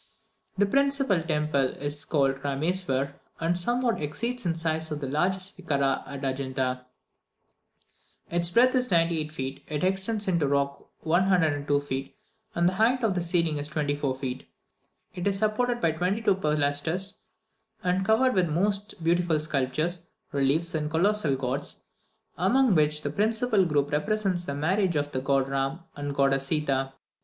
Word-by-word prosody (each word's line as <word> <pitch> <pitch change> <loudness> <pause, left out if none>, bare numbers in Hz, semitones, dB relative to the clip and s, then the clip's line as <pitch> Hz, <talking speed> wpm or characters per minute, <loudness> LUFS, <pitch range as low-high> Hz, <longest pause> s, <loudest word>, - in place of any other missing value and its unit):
The 205 - +4
principal 275 -5 +2
temple 150 -4 0
is 145 0 -4
called 135 -3 +1
Rameswur, 140 -1 0 0.3
and 165 +1 +1
somewhat 240 +5 0
exceeds 235 +9 -3
in 165 - 0
size 160 -1 -1
the 150 -2 -4
largest 185 +7 -1
vichara 140 -6 0
at 140 0 -7
Adjunta; 130 -1 -2 1.5
its 170 0 +2
breadth 245 +7 +4
is 255 -1 +2
ninety 165 -2 +2
eight 155 0 -4
feet, 135 -3 -5
it 150 0 -3
extends 195 +3 0
into 175 -3 +2
the 145 - +1
rock 140 0 -1
102 160 -5 +2
feet, 135 -1 -5 0.4
and 170 0 +3
the 185 - +2
height 235 +6 +2
of 220 -4 +2
the 180 - -1
ceiling 170 -3 +1
is 145 - 0
twenty 150 -1 -1
four 145 -2 -1
feet; 130 -1 -6 0.6
it 180 +2 -3
is 195 -1 +1
supported 235 +4 0
by 165 -8 +2
twenty 180 +6 -1
two 205 - +4
pilasters, 155 +3 0 0.7
and 185 +1 +1
covered 230 +6 +3
with 185 -2 +2
the - - -5
most 200 +2 -1
beautiful 170 -1 +2
sculptures, 155 +3 -1 0.3
reliefs, 145 +5 +1
and 150 -1 -1
colossal 170 -2 +2
gods, 135 +2 -3 0.6
among 240 +6 +4
which 150 -2 +2
the 145 - -2
principal 220 +1 +2
group 145 -3 0
represents 190 +2 0
the 140 - -3
marriage 180 +4 +1
of 145 0 -1
the 130 - -2
god 135 0 +1
Ram 135 +4 -2
and 145 0 -4
the - - -3
goddess 135 -1 +2
Seeta. 135 -3 0
160 Hz, 160 wpm, -27 LUFS, 145-190 Hz, 1.5 s, The